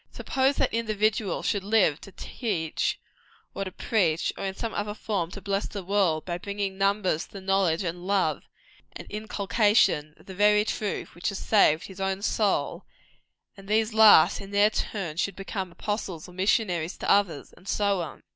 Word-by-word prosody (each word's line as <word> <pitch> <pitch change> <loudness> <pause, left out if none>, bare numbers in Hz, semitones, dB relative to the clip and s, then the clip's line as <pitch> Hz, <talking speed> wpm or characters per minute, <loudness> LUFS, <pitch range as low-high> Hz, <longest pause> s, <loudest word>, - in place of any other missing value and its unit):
Suppose 270 -1 0
that 270 - 0
individual 215 -2 0
should 205 -3 0
live 200 -8 +2
to 195 - -11
teach 185 -6 -3 0.5
or 195 - -3
to 185 - -6
preach, 175 -5 0
or - - -5
in 190 0 -3
some 230 +2 -4
other 210 0 -3
form 195 -6 -2
to 200 - -9
bless 200 +1 -1
the 200 -2 -6
world, 180 -5 +1
by 175 -1 -3
bringing 200 0 -3
numbers 195 -4 0
to - - -26
the 200 - -7
knowledge, 190 -2 +1
and 175 +1 -5
love, 190 -7 +1 0.5
and - - -9
inculcation 205 -7 +1
of - - -20
the 190 - -9
very 210 +2 +4
truth 215 -1 -3
which 175 - -2
has 200 - -5
saved 170 -9 +3
his 190 0 -10
own 190 +1 -2
soul 210 -2 0 0.7
and 195 -1 -14
these 220 +1 +1
last, 220 -7 +7
in 195 - -9
their 205 +1 +4
turn, 185 -8 -3
should 195 +1 -1
become 195 -1 -5
apostles 190 -4 -4
or 180 - -14
missionaries 185 -3 0
to - - -5
others, 180 -8 +1
and 190 - -18
so 200 -3 +1
on. 160 - -8
195 Hz, 180 wpm, -26 LUFS, 180-210 Hz, 0.7 s, last